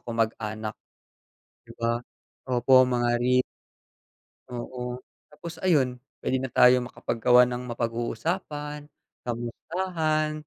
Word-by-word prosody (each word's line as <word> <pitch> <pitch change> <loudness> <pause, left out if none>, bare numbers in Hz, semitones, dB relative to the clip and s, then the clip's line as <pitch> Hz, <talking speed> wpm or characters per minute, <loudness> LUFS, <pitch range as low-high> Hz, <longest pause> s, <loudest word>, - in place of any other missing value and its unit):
kamag-anak. 110 -2 -2 0.9
'Di - - -12
ba? 115 0 +1 0.5
Opo, 130 0 +5
mga 120 -1 +1
ri 125 0 +4 1.1
Oo, 125 0 -5 0.3
tapos 170 +3 -8
ayun, 140 -9 +3 0.2
puwede 130 - -1
na 130 - -4
tayo 125 +1 +6
makapaggawa 125 0 +3
ng 125 0 -4
mapag-uusapan, 145 +6 -3 0.3
kamustahan. 155 +6 -1
125 Hz, 90 wpm, -26 LUFS, 120-150 Hz, 1.1 s, tayo